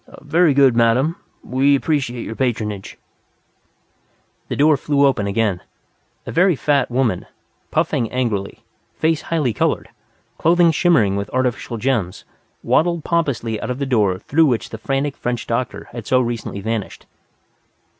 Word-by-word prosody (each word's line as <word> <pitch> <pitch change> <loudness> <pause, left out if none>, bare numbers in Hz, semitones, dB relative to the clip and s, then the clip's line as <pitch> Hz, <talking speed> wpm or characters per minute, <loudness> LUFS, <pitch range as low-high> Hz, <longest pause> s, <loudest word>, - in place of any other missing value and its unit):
"Very 155 0 +3
good, 135 -3 +5
madam. 120 +7 +2 0.3
We 135 +3 +2
appreciate 135 -5 -1
your - - -5
patronage." 110 -6 -3 1.5
The - - -3
door 150 +1 +4
flew 140 0 +1
open 120 -7 +1
again. 100 -3 0 0.6
A - - -5
very 180 0 +3
fat 145 +1 +1
woman, 120 -6 0 0.4
puffing 115 - 0
angrily, 115 -6 -2 0.3
face 160 -1 +1
highly 150 -8 -1
colored, - - -1 0.5
clothing 170 +1 +4
shimmering 145 - +3
with 100 +1 -4
artificial 125 -2 -2
gems, 115 -7 -2 0.4
waddled 170 -1 +1
pompously 135 -10 -1
out - - -4
of 125 - -2
the 140 - -2
door 105 -8 +1
through 155 +11 +2
which 120 -5 -1
the 110 - -8
frantic 135 +4 -1
French 120 -1 -3
doctor 120 +2 -3
had 120 -3 -8
so 130 - +3
recently 115 -4 -3
vanished. 110 0 -4
125 Hz, 140 wpm, -20 LUFS, 115-145 Hz, 1.5 s, good